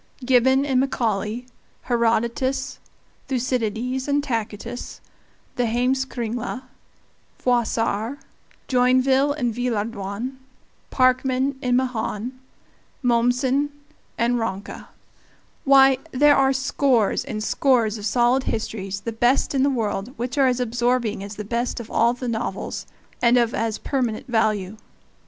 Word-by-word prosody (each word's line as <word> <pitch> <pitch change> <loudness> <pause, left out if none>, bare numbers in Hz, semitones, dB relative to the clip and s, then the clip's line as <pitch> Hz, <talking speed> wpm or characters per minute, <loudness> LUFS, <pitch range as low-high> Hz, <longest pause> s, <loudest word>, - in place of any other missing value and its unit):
Gibbon 260 +2 +4
and 265 -3 +2
Macaulay, 230 -3 -1 0.4
Herodotus, 235 +3 0 0.5
Thucydides 250 0 -1
and 285 0 +1
Tacitus, 230 -1 -4 0.6
the 245 -1 +1
Heimskringla, 245 0 -1 0.7
Froissart, 235 0 0 0.5
Joinville 260 +2 +3
and 245 -6 -1
Villehardouin, 230 0 -3 0.5
Parkman 260 +1 +2
and 250 -1 +2
Mahan, 245 -2 -2 0.7
Mommsen 250 +4 +2 0.5
and 240 +1 +1
Ranke 205 -3 -5 0.8
why! 270 -1 +6
there 290 +2 +5
are 270 0 +4
scores 265 -4 +1
and 215 -1 -4
scores 230 -5 +2
of 205 - -6
solid 245 +4 +2
histories, 200 -3 -3
the 230 - -4
best 240 +6 +2
in 270 - +2
the 280 - +4
world, 225 -1 -2
which 245 +1 -3
are 275 -2 +4
as 250 -1 +1
absorbing 240 -2 0
as 205 +1 -7
the 210 - -6
best 235 +4 -2
of 230 - -9
all 235 +1 +3
the 250 0 -5
novels, 230 -1 -3 0.3
and 240 +1 +5
of 235 -1 +2
as 225 -1 -1
permanent 245 -6 -2
value. 215 -4 0
245 Hz, 115 wpm, -23 LUFS, 225-260 Hz, 0.8 s, why